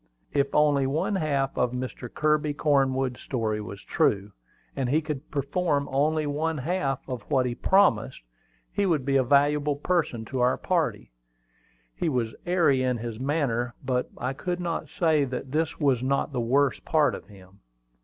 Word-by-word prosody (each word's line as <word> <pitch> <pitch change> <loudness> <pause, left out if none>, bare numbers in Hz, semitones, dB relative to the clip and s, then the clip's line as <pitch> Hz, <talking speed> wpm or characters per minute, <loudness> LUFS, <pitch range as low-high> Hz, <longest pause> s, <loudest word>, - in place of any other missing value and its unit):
If 140 -1 +1
only 145 -3 +4
one 155 +9 0
half 140 -5 0
of 125 0 0
Mr. 125 -1 -5
Kirby 150 -1 +1
Cornwood's 135 -4 +1
story 110 -4 -2
was 100 -1 -8
true, 100 0 +1 0.4
and 135 -3 -1
he 150 +4 +3
could 150 -2 -5
perform 145 +1 0
only 150 +3 +1
one 155 +2 -1
half 140 -2 -2
of 125 -3 -4
what 130 -2 +2
he 125 - -1
promised, 130 - +2 0.5
he 200 - 0
would 155 -7 +1
be 135 0 +1
a 135 - +4
valuable 145 +2 +3
person 145 -7 -1
to 130 +2 -4
our 125 +1 +3
party. 155 - -1 0.8
He 165 - -1
was 120 -5 -1
airy 170 -7 +3
in 125 -1 +1
his 115 -1 -6
manner; 130 -4 -1
but 125 -1 0
I 130 +2 -2
could 175 +5 -3
not 165 -4 -3
say 160 -3 +2
that 130 0 -5
this 160 +2 -1
was 135 -5 +2
not 140 +3 0
the 125 - 0
worst 135 +4 +1
part 155 -2 +2
of - - -8
him. 95 -1 -17
140 Hz, 170 wpm, -26 LUFS, 125-155 Hz, 0.8 s, only